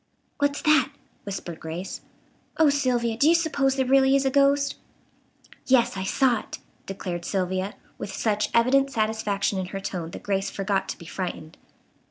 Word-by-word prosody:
"What's 285 0 0
that?" 300 -4 +4 0.4
whispered 185 -4 -6
Grace. 165 +4 -6 0.6
"Oh, 315 -3 +5
Sylvia, 245 -5 +1
do 280 +7 +4
you 335 - +6
suppose 280 -5 +1
there 265 -1 +1
really 270 +1 +4
is 275 0 +2
a 265 - +2
ghost?" 280 +1 +3 0.9
"Yes, 245 -3 +3
I 190 0 -3
saw 250 +2 +2
it," - - -9 0.3
declared 180 -3 -5
Sylvia, 185 +1 -2 0.2
with 200 - -5
such 210 +1 0
evident 265 +4 +3
satisfaction 215 -5 0
in 185 - -3
her 195 +1 -5
tone 180 -4 -4
that - - -9
Grace 195 -1 -1
forgot 195 -1 -1
to - - -4
be 170 - -12
frightened. 170 -2 -5
225 Hz, 165 wpm, -25 LUFS, 195-270 Hz, 0.9 s, you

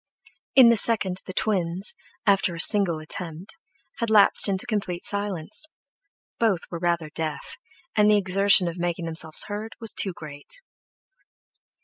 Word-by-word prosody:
In 255 -3 +8
the 235 - +4
second 205 -4 +2
the - - -6
twins, 185 -2 -1 0.3
after 195 -4 +1
a - - -9
single 195 -3 +2
attempt, 165 - -6 0.4
had 230 - -2
lapsed 210 -1 +4
into 195 +3 +1
complete 200 -7 -4
silence; 205 - 0 0.7
both 215 -7 +1
were 170 - -5
rather 170 -3 -2
deaf, 155 -1 -5 0.4
and 210 0 +3
the 210 - +4
exertion 195 -1 +3
of 170 +1 -6
making 175 -1 -3
themselves 160 -1 +3
heard 210 +2 -7
was 225 -2 -4
too 190 - -1
great. 150 - -10
190 Hz, 140 wpm, -24 LUFS, 170-210 Hz, 0.7 s, In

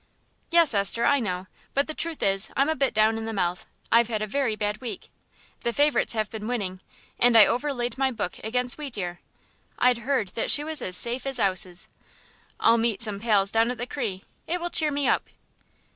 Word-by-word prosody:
"Yes, 335 -5 +4
Esther, 205 +3 +3
I 285 +2 +3
know; 185 -5 -3 0.3
but 280 +1 +2
the 310 - -4
truth 330 0 -3
is, 195 0 +2
I'm 275 +3 +2
a 315 - +1
bit 275 -1 +1
down 220 +1 +2
in 220 - -5
the 225 - -4
mouth. 180 -3 -2 0.2
I've 230 0 +5
had 215 -2 -2
a - - -1
very 230 +1 -1
bad 210 +1 -3
week. 245 -3 -7 0.5
The 235 - -1
favourites 290 -1 +2
has 215 -2 -1
been 215 0 -7
winning, 200 -7 -3 0.4
and 240 -1 +5
I 215 - +9
overlaid 245 -1 -2
my 270 -1 +2
book 205 -7 -5
against 250 +4 0
Wheatear; 200 -12 -4 0.6
I'd 250 -1 +3
heard 235 -4 -1
that 225 - -3
she 290 - +4
was 315 0 -2
as 180 -1 +3
safe 245 +3 +2
as 270 -2 -1
'ouses. 185 -3 +1 0.7
I'll 230 0 +4
meet 230 -1 0
some 210 -3 -1
pals 200 -3 +2
down 225 +1 +2
at 250 - -4
the 245 - -4
'Cri'; 225 -8 -4 0.2
it 355 +2 -1
will 350 0 -4
cheer 310 -2 +3
me 285 -1 -1
up." - - 0
230 Hz, 205 wpm, -25 LUFS, 210-270 Hz, 0.7 s, I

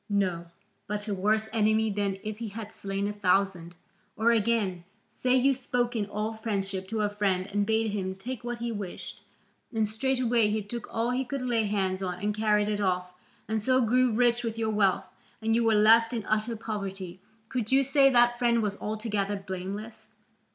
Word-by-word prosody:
No; 185 -4 0 0.4
but 210 +1 -3
a 205 - -1
worse 215 +3 +1
enemy 220 0 +2
than 200 -1 -1
if 215 0 -5
he 230 - -4
had 215 +1 -7
slain 195 -1 -3
a 210 - -3
thousand. 190 -3 0 0.4
Or 230 +2 +3
again, 215 -5 +1 0.3
say 255 0 +1
you 265 +2 +4
spoke 245 -1 -1
in 210 -3 -1
all 210 +2 -3
friendship 195 -4 -3
to 220 +1 -2
a 210 - +1
friend 195 -3 0
and 205 0 +1
bade 220 -1 +1
him 190 -2 -3
take 240 +5 -6
what 240 0 -3
he 235 0 -3
wished, 205 -5 -7 0.5
and 220 -3 +1
straightway 240 0 +1
he 210 0 -1
took 235 +3 -6
all 230 +2 0
he 255 +1 0
could 265 +1 -4
lay 235 -3 +1
hands 195 -2 -1
on 180 -2 -2
and 205 +2 -1
carried 210 -1 +2
it 210 -1 -1
off, 180 -2 -1 0.3
and 220 0 -1
so 255 +4 +3
grew 250 +2 +3
rich 240 +1 +2
with 225 -1 -3
your 220 -1 0
wealth, 195 -3 +1 0.3
and 225 0 0
you 235 +1 +3
were 225 -1 +3
left 225 +2 +5
in 225 -4 -3
utter 215 +2 0
poverty, 195 -4 -5 0.3
could 240 -3 -3
you 270 +1 +5
say 275 0 +5
that 240 -1 +4
friend 235 -2 +3
was 200 -1 -2
altogether 210 -2 -2
blameless? 195 +3 -6
215 Hz, 195 wpm, -28 LUFS, 200-235 Hz, 0.5 s, left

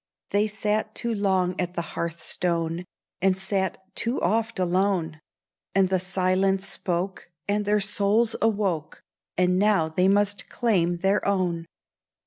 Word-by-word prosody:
They 205 +1 +3
sat 215 +1 -1
too 235 -1 -1
long 190 -3 +1
at 180 0 -3
the 170 - -1
hearthstone, 170 0 -2 0.4
And 190 0 +3
sat 190 -1 -1 0.2
too 235 +3 0
oft 225 +4 0
alone: 180 -3 0 0.6
And 190 -1 +4
the 185 -1 +2
silence 190 +1 +1
spoke, 185 0 -3 0.2
and 205 +1 0
their 210 +1 +3
souls 210 +3 +2
awoke, 195 -8 0 0.3
And 180 0 +3
now 200 -6 +3
they 180 +4 +2
must 205 +1 +2
claim 180 -8 +1
their 195 +3 +1
own. 175 -4 0
190 Hz, 130 wpm, -25 LUFS, 180-205 Hz, 0.6 s, And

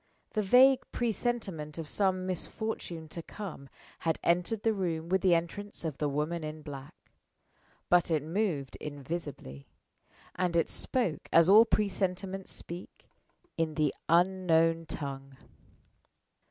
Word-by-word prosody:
The 215 - 0
vague 255 +6 +6
presentiment 215 -10 -2
of 165 -2 -5
some 185 +1 +1
misfortune 180 -2 -4
to 170 - -5
come 165 -7 -8 0.3
had 160 -1 0
entered 180 +5 +1
the 225 - +3
room 170 -4 -2
with 190 0 +2
the 180 -2 +5
entrance 175 +3 -3
of 155 -4 -4
the 150 - +1
woman 155 +4 -2
in 155 0 -6
black. 140 -2 -8 0.9
But 175 -1 +4
it 155 -3 +1
moved 160 - -1
invisibly; 145 - -6 0.7
and 180 -2 -1
it 165 - +2
spoke 210 - -1
as 165 +1 +6
all 215 +3 +9
presentiments 195 -2 -1
speak, 175 +2 -6 0.5
in 160 -2 0
the 150 -3 +1 0.2
Unknown 165 -2 +3
Tongue. 135 -3 -6
170 Hz, 125 wpm, -30 LUFS, 155-195 Hz, 0.9 s, all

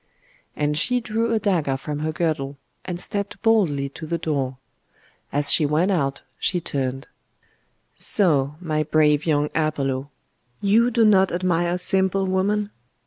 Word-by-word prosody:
And 150 0 0
she 250 +8 +2
drew 230 0 -1
a 225 - +2
dagger 175 -10 0
from 145 +2 -5
her 155 +1 -1
girdle, 155 -4 -2 0.3
and 175 -2 -5
stepped 200 +2 -3
boldly 180 -12 +2
to 160 +3 -9
the 170 - -1
door. 140 -5 -2 0.7
As 145 0 0
she 160 - +4
went 155 +6 +2
out 140 -7 -1 0.2
she 180 - +1
turned 135 -3 -3 0.9
'So! 150 -8 +1
my 155 -4 -1
brave 150 0 +2
young 150 -1 +1
Apollo! 140 -4 -1 0.5
You 220 +4 +3
do 230 -1 +3
not 195 -3 +4
admire 175 0 0
simple 190 +1 +1
woman? 200 +2 0
165 Hz, 140 wpm, -23 LUFS, 145-195 Hz, 0.9 s, she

